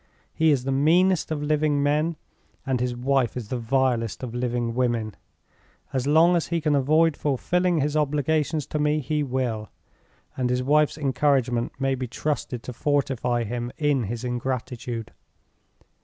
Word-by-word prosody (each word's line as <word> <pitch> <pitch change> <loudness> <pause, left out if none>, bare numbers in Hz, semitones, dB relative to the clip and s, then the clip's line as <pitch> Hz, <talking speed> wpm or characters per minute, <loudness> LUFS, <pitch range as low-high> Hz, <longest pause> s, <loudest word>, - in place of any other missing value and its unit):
He 160 0 +3
is 140 -4 +2
the 135 - -2
meanest 170 +6 +3
of 150 -2 -2
living 150 -1 +1
men, 150 +3 +1 0.5
and 130 -2 0
his 125 0 -1
wife 130 0 0
is 115 -4 -6
the 125 - -2
vilest 120 -1 0
of 120 -2 -5
living 120 -1 -1
women. 120 -3 -1 0.8
As 130 0 -1
long 165 +4 +5
as 170 - 0
he 170 -1 0
can 150 -1 +1
avoid 155 +3 +3
fulfilling 175 +4 0
his 145 +2 -1
obligations 150 0 0
to 150 - -3
me, 150 +1 +2
he 150 +1 -1
will; 125 -6 -2 0.7
and 125 -1 -1
his 125 0 0
wife's 150 +3 +3
encouragement 135 -4 +1
may 135 0 +1
be 130 -1 -3
trusted 125 -2 -3
to 125 - -6
fortify 130 -3 0
him 120 +2 -4
in 145 -5 +1
his 115 +4 -5
ingratitude. 125 -2 -4
135 Hz, 155 wpm, -25 LUFS, 125-150 Hz, 0.8 s, long